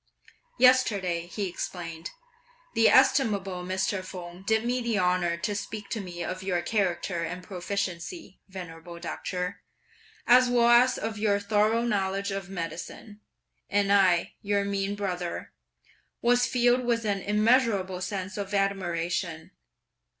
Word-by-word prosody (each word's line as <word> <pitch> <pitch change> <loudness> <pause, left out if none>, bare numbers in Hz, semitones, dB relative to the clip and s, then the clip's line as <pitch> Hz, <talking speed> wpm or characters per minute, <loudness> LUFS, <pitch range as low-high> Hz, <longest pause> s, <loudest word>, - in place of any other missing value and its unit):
"Yesterday," 200 -10 +3
he 200 +2 -3
explained, 170 -2 -6 0.6
"the - - +5
estimable 195 -8 +3
Mr. 190 +1 -1
Feng 180 -1 -9
did 220 +3 +1
me 250 +1 0
the 235 -3 0
honour 180 -2 +1
to 205 +5 -2
speak 205 0 -6
to 225 - -3
me 175 -2 -6
of 185 +2 -4
your 180 -2 -1
character 175 -3 -1
and 180 +2 -5
proficiency, 190 - -5
venerable 170 -2 -9
doctor, 180 +2 -4 0.6
as 250 +1 +6
well 240 -1 +4
as 245 +2 +5
of 220 -1 -4
your 205 -1 +2
thorough 215 +3 +2
knowledge 200 -3 -1
of 195 -1 -4
medicine, 185 +4 -7 0.5
and 200 0 +2
I, 185 -4 +3
your 200 -1 0
mean 200 0 -1
brother, 180 -4 -4 0.7
was 245 +1 +3
filled 245 0 +3
with 235 -2 0
an 200 -2 0
immeasurable 210 -3 +2
sense 190 +1 -4
of 200 0 -3
admiration!" 175 -3 -1
195 Hz, 130 wpm, -27 LUFS, 180-215 Hz, 0.7 s, as